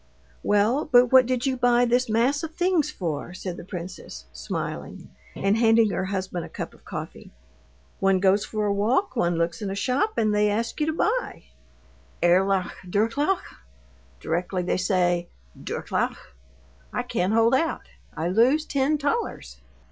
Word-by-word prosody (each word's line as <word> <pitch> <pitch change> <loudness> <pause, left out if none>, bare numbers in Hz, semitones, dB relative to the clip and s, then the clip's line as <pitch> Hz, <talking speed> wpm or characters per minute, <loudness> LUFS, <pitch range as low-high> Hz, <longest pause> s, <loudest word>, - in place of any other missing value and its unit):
"Well, 215 +8 +2
but 245 -1 +6
what 260 -2 +7
did 255 0 -1
you 265 -1 +1
buy 245 -1 +3
this 245 +1 +1
mass 245 +6 +2
of 325 0 -7
things 350 -5 +1
for?" 175 - -4
said 185 -1 -5
the - - -9
princess, 170 - -8
smiling, 65 +1 -6 0.3
and 195 +1 +1
handing 225 -2 +4
her 190 - -2
husband 190 -2 -3
a - - -9
cup - - -6
of - - -21
coffee. - - -8 0.7
"One 195 -1 +3
goes 195 +2 +3
for 215 -1 -3
a 205 - +1
walk, 240 - +1
one 175 -7 +1
looks 170 +2 -1
in 205 - -3
a 195 - -3
shop, 275 - 0
and 215 -1 +2
they 210 0 +3
ask 230 +7 -2
you 305 - +1
to 315 - 0
buy. 460 +9 -1 0.8
'Erlaucht, 185 +2 +3 0.2
Durchlaucht?' 230 - 0 0.6
Directly 180 - -2
they 180 - 0
say 175 -2 +1 0.3
'Durchlaucht,' 65 - -4 0.6
I - - -2
can't 185 +4 -1
hold 230 +2 +4
out. 320 +5 0 0.3
I 160 - -1
lose 245 - +3
ten 285 +1 +1
thalers." 285 - -3
215 Hz, 160 wpm, -25 LUFS, 185-260 Hz, 0.8 s, what